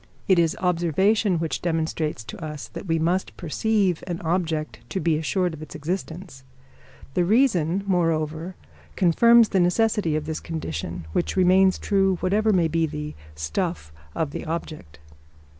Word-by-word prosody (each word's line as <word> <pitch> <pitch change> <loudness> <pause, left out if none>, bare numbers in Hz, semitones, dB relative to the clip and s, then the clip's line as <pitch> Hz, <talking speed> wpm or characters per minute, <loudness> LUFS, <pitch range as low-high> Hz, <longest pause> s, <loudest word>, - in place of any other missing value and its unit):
It 190 -3 +5
is 165 -1 +1
observation 180 +3 +2
which 160 -4 -2
demonstrates 160 -6 -2
to 110 +8 -9
us 150 -2 -6
that - - -8
we 165 0 +1
must 175 +4 -1
perceive 190 +1 0
an 175 -1 -3
object 160 -4 -1
to 190 - -2
be 165 -3 +1
assured 175 +3 0
of 155 - -9
its 155 - -9
existence; 160 -2 -5 0.7
the 180 - +2
reason, 195 - +2
moreover, 165 -2 0 0.4
confirms 230 +6 +5
the 190 - +1
necessity 180 -2 +2
of 155 -1 -2
this 160 0 -3
condition, 85 - -5
which - - -1
remains 185 0 +4
true 195 -2 +2
whatever 210 +5 +1
may 175 -4 +3
be 165 0 +1
the 150 0 -5 0.2
"stuff" 75 0 -3 0.2
of 155 -3 -1
the - - -5
object. 155 - -6
170 Hz, 150 wpm, -24 LUFS, 155-190 Hz, 0.7 s, It